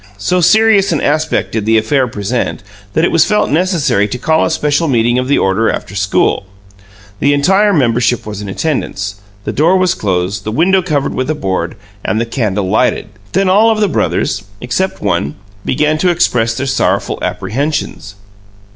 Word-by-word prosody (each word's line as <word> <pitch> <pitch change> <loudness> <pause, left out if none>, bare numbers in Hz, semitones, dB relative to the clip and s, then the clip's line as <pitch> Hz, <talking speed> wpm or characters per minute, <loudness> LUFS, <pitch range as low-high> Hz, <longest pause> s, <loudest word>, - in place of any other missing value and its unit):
So 180 - 0
serious 210 +2 +4
an 160 - +1
aspect 155 +2 0
did 110 -2 -3
the 110 0 +4
affair 125 +4 +1
present 105 +1 -3 0.3
that 160 - +2
it - - 0
was 165 - +4
felt 210 +3 +1
necessary 150 - +1
to 115 - -4
call 160 +5 +1
a - - +1
special 150 0 0
meeting 120 -2 +2
of 125 - -2
the 140 - +2
order 95 +4 +1
after 95 - -4
school. 95 0 0 0.7
The 145 +1 +3
entire 195 +8 +3
membership 120 - +1
was 105 -1 -6
in 105 - -6
attendance; 105 -6 -3 0.2
the - - -4
door 165 +6 +3
was 185 -1 +2
closed, 95 - -2
the 110 - -4
window 185 - +3
covered 150 -6 -1
with 130 +2 -2
a 155 - 0
board, 95 - -2 0.3
and 110 - -1
the 115 - 0
candle 105 -5 -2
lighted. 110 +1 +1 0.2
Then 195 0 +2
all 210 +5 +4
of 220 -1 +1
the 210 - +3
brothers 100 - -1 0.2
except 155 +11 -2
one 70 - -1 0.3
began 150 +3 +1
to 180 - +2
express 120 -9 +1
their 135 - -2
sorrowful 135 - 0
apprehensions. 135 -5 -3
135 Hz, 180 wpm, -14 LUFS, 105-170 Hz, 0.7 s, serious